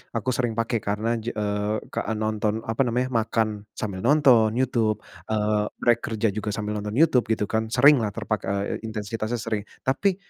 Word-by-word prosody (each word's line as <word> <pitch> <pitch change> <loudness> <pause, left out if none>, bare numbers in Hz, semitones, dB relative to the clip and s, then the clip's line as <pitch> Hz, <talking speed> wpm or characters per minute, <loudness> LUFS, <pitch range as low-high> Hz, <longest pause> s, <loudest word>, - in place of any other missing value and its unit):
aku 115 +3 0
sering 120 -2 -1
pakai 115 0 0
karena 110 +3 -1
ja 115 +2 -4
eee, 105 0 -1 0.2
ka - - -3
nonton 110 0 -1
apa 110 +4 -1
namanya, 125 +2 0
makan 110 -2 0
sambil 100 -4 -4
nonton 120 -4 +4
YouTube, 115 -5 +1 0.2
eee, 105 -1 +1 0.2
rek 120 -1 +4
kerja 110 -2 -1
juga 105 +1 -5
sambil 105 0 -3
nonton 105 +2 -5
YouTube 135 -5 +4
gitu 110 -2 0
kan. 110 +2 -1
Sering 140 +4 +6
lah 105 -2 -1
terpak 110 -2 -2 0.4
intensitasnya 110 +1 -4
sering 110 -3 -3 0.2
tapi 180 +9 +1
110 Hz, 170 wpm, -25 LUFS, 105-120 Hz, 0.4 s, Sering